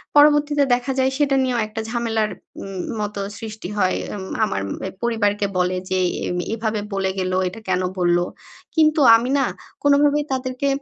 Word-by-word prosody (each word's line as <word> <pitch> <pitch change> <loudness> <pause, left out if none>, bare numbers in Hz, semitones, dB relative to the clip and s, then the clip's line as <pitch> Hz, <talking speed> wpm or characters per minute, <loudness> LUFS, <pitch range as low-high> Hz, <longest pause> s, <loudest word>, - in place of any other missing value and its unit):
পরবর্তীতে 295 0 +5
দেখা 245 +2 0
যায় 260 0 +3
সেটা 285 -2 +2
নিয়েও 250 -2 0
একটা 215 +1 -5
ঝামেলার 225 -2 0 0.3
উম 195 -1 -6 0.2
মতো 210 -1 -3 0.2
সৃষ্টি 215 -4 -7
হয়। 185 -2 +2 0.2
এম 195 - -6 0.2
আমার 100 - -2 0.3
এ - - -10
পরিবারকে 205 -3 +1
বলে 180 0 +1
যে, 185 - +1 0.3
"এম 180 - -2 0.2
এভাবে 220 -2 -2
বলে 195 -1 0
গেলো। 185 0 0
এটা 185 +5 -6
কেনো 185 0 +1
বললো?" 175 0 +3 0.5
কিন্তু 310 -1 +4 0.2
আমি 235 +3 0
না 270 - +3 0.4
কোনো 285 -1 +5
ভাবেই 295 0 +2
তাদেরকে 255 +1 -2
225 Hz, 165 wpm, -21 LUFS, 190-265 Hz, 0.5 s, পরবর্তীতে